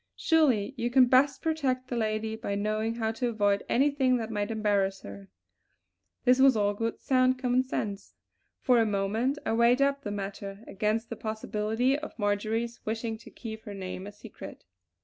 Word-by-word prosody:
Surely 270 Hz, -10 st, +2 dB
you 240 Hz, 0 st, -1 dB
can 255 Hz, +1 st, +6 dB
best 260 Hz, +2 st, +3 dB
protect 270 Hz, -6 st, -1 dB
the 245 Hz, -, -4 dB
lady 220 Hz, -1 st, -1 dB
by 200 Hz, -2 st, -3 dB
knowing 215 Hz, +2 st, -1 dB
how 220 Hz, -1 st, -1 dB
to 235 Hz, +2 st, -2 dB
avoid 205 Hz, -3 st, +1 dB
anything 270 Hz, -1 st, +3 dB
that 225 Hz, -1 st, -4 dB
might 205 Hz, -1 st, -2 dB
embarrass 205 Hz, -3 st, 0 dB
her!" 100 Hz, -1 st, -10 dB, 1.0 s
This 250 Hz, +1 st, +5 dB
was 265 Hz, -3 st, +6 dB
all 205 Hz, -1 st, +2 dB
good 225 Hz, +2 st, -3 dB
sound 255 Hz, -1 st, +2 dB
common 255 Hz, 0 st, +2 dB
sense. 205 Hz, -6 st, -4 dB, 0.5 s
For 250 Hz, -3 st, +4 dB
a 225 Hz, -, +4 dB
moment 215 Hz, +7 st, 0 dB
I -, -, 0 dB
weighed 235 Hz, +2 st, +4 dB
up 280 Hz, 0 st, +2 dB
the 270 Hz, -, -5 dB
matter 200 Hz, 0 st, -6 dB
against 215 Hz, +3 st, -2 dB
the -, -, -3 dB
possibility 220 Hz, +3 st, -1 dB
of 305 Hz, -, -9 dB
Marjory's 220 Hz, +3 st, -1 dB
wishing 225 Hz, +1 st, -3 dB
to -, -, -13 dB
keep 220 Hz, -2 st, -8 dB
her 205 Hz, -, -7 dB
name 185 Hz, 0 st, -6 dB
a -, -, -7 dB
secret. 205 Hz, -, -11 dB
225 Hz, 175 wpm, -28 LUFS, 205-255 Hz, 1.0 s, can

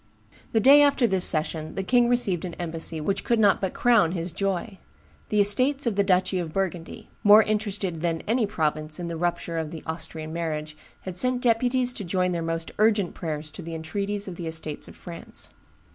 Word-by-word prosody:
"The 225 Hz, -, +2 dB
day 275 Hz, +5 st, +7 dB
after 280 Hz, -3 st, +4 dB
this 190 Hz, -4 st, +3 dB
session 155 Hz, 0 st, +2 dB
the 195 Hz, -, -2 dB
king 240 Hz, +4 st, +3 dB
received 205 Hz, -8 st, +1 dB
an 175 Hz, -2 st, -5 dB
embassy 165 Hz, -1 st, -3 dB
which 195 Hz, +6 st, -2 dB
could 235 Hz, -, +1 dB
not 205 Hz, -3 st, +3 dB
but 190 Hz, -2 st, -2 dB
crown 220 Hz, -9 st, +3 dB
his 170 Hz, -1 st, -3 dB
joy: 195 Hz, +2 st, -3 dB, 0.5 s
the 210 Hz, -, +1 dB
estates 255 Hz, +8 st, +2 dB
of 230 Hz, -4 st, 0 dB
the 200 Hz, -, +3 dB
duchy 185 Hz, -1 st, +1 dB
of 165 Hz, -3 st, -4 dB
Burgundy, 180 Hz, -2 st, -4 dB
more 210 Hz, +1 st, +8 dB
interested 205 Hz, -6 st, -2 dB
than 165 Hz, -1 st, -1 dB
any 230 Hz, +1 st, +2 dB
other 205 Hz, -, -10 dB
province 155 Hz, -2 st, -2 dB
in 170 Hz, -1 st, -4 dB
the 170 Hz, -, -4 dB
rupture 170 Hz, 0 st, -2 dB
of 160 Hz, -1 st, -4 dB
the 160 Hz, -1 st, -9 dB
(Austrian) 160 Hz, -1 st, -5 dB
marriage, 155 Hz, -2 st, -4 dB, 0.3 s
had 185 Hz, -1 st, -7 dB
sent 255 Hz, +3 st, +2 dB
deputies 245 Hz, +1 st, +2 dB
to 210 Hz, -, -6 dB
join 180 Hz, 0 st, 0 dB
their 170 Hz, -1 st, -2 dB
most 165 Hz, 0 st, -3 dB
urgent 210 Hz, -4 st, +2 dB
prayers 155 Hz, -2 st, -5 dB
to 185 Hz, -, -9 dB
the 165 Hz, -1 st, -6 dB
entreaties 200 Hz, +6 st, -3 dB
of 180 Hz, -3 st, -7 dB
the 170 Hz, -, -5 dB
estates 160 Hz, -2 st, -4 dB
of -, -, -13 dB
France. 170 Hz, -1 st, -4 dB
185 Hz, 205 wpm, -25 LUFS, 165-215 Hz, 0.5 s, more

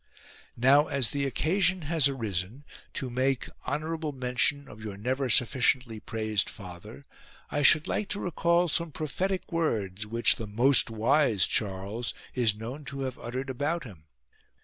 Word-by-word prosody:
lo. -, -, -40 dB, 0.5 s
Now 140 Hz, +5 st, +5 dB
as 135 Hz, -5 st, +2 dB
the 140 Hz, -1 st, -1 dB
occasion 175 Hz, +5 st, +1 dB
has 150 Hz, -2 st, +2 dB
arisen 110 Hz, 0 st, -4 dB, 0.3 s
to 130 Hz, -2 st, -3 dB
make 130 Hz, +1 st, 0 dB, 0.2 s
honour 155 Hz, +2 st, -2 dB
able 160 Hz, -2 st, -3 dB
mention 130 Hz, +2 st, 0 dB
of 110 Hz, -3 st, -12 dB
your 105 Hz, -3 st, -6 dB
never 130 Hz, +5 st, -1 dB
sufficiently 125 Hz, -1 st, +2 dB
praised 110 Hz, -2 st, -1 dB
father, 100 Hz, +7 st, -11 dB, 0.5 s
I 145 Hz, -, 0 dB
should 155 Hz, +2 st, +6 dB
like 210 Hz, -, -2 dB
to 205 Hz, -, -1 dB
recall 170 Hz, 0 st, +1 dB
some 170 Hz, 0 st, -1 dB
prophetic 180 Hz, +7 st, -3 dB
words 105 Hz, -, -1 dB
which 115 Hz, +2 st, +3 dB
the 110 Hz, -, -6 dB
most 120 Hz, +6 st, +4 dB
wise 115 Hz, -, +3 dB
Charles 100 Hz, +3 st, -3 dB, 0.2 s
is 115 Hz, -5 st, +2 dB
known 120 Hz, +7 st, -7 dB
to 140 Hz, 0 st, -5 dB
have 130 Hz, -2 st, -4 dB
uttered 130 Hz, +3 st, -4 dB
about 145 Hz, +6 st, -2 dB
him. 90 Hz, -, -13 dB
130 Hz, 155 wpm, -28 LUFS, 110-150 Hz, 0.5 s, should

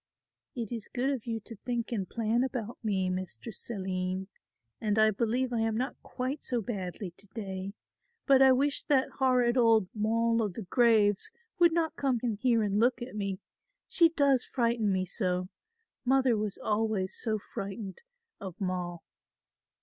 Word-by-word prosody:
"It 230 Hz, -4 st, -4 dB
is 230 Hz, -4 st, -5 dB
good 260 Hz, +3 st, 0 dB
of 255 Hz, -4 st, -4 dB
you 225 Hz, -1 st, -1 dB
to 230 Hz, +2 st, -9 dB
think 240 Hz, +2 st, -3 dB
and 200 Hz, -6 st, -2 dB
plan 230 Hz, +2 st, +1 dB
about 245 Hz, -4 st, -4 dB
me, 195 Hz, -4 st, +1 dB
Mistress 185 Hz, +5 st, -5 dB
Aline, 185 Hz, -2 st, -3 dB, 0.5 s
and 210 Hz, -1 st, 0 dB
I 215 Hz, 0 st, +5 dB
believe 240 Hz, +4 st, 0 dB
I 235 Hz, -, +1 dB
am 225 Hz, -1 st, +1 dB
not 255 Hz, +3 st, -2 dB
quite 260 Hz, +3 st, -4 dB
so 245 Hz, -, -1 dB
badly 195 Hz, -4 st, -4 dB
to 200 Hz, +4 st, -14 dB
day, 195 Hz, -2 st, -5 dB, 0.5 s
but 270 Hz, -2 st, +6 dB
I 265 Hz, 0 st, +8 dB
wish 280 Hz, +2 st, +2 dB
that 270 Hz, -3 st, +2 dB
horrid 250 Hz, -2 st, +3 dB
old 225 Hz, -5 st, +4 dB
'Moll 230 Hz, +2 st, +1 dB
o' 215 Hz, -, +1 dB
the 205 Hz, +3 st, -6 dB
graves' 215 Hz, -1 st, +3 dB, 0.3 s
would 340 Hz, -1 st, +6 dB
not 325 Hz, -1 st, 0 dB
come 265 Hz, -4 st, +1 dB
in 235 Hz, -3 st, +1 dB
here 230 Hz, +1 st, +2 dB
and 205 Hz, 0 st, +1 dB
look 240 Hz, +1 st, +3 dB
at 240 Hz, -, -8 dB
me. 195 Hz, -2 st, -3 dB, 0.5 s
She 335 Hz, -2 st, +5 dB
does 280 Hz, -5 st, +3 dB
frighten 235 Hz, -4 st, +1 dB
me 185 Hz, -1 st, +1 dB
so. 180 Hz, -1 st, -2 dB, 0.5 s
Mother 260 Hz, -2 st, +3 dB
was 210 Hz, -2 st, -2 dB
always 210 Hz, -3 st, 0 dB
so 220 Hz, -2 st, -1 dB
frightened 195 Hz, 0 st, -6 dB, 0.4 s
of 190 Hz, -3 st, -8 dB
Moll." 180 Hz, -3 st, -3 dB
225 Hz, 165 wpm, -30 LUFS, 195-250 Hz, 0.5 s, I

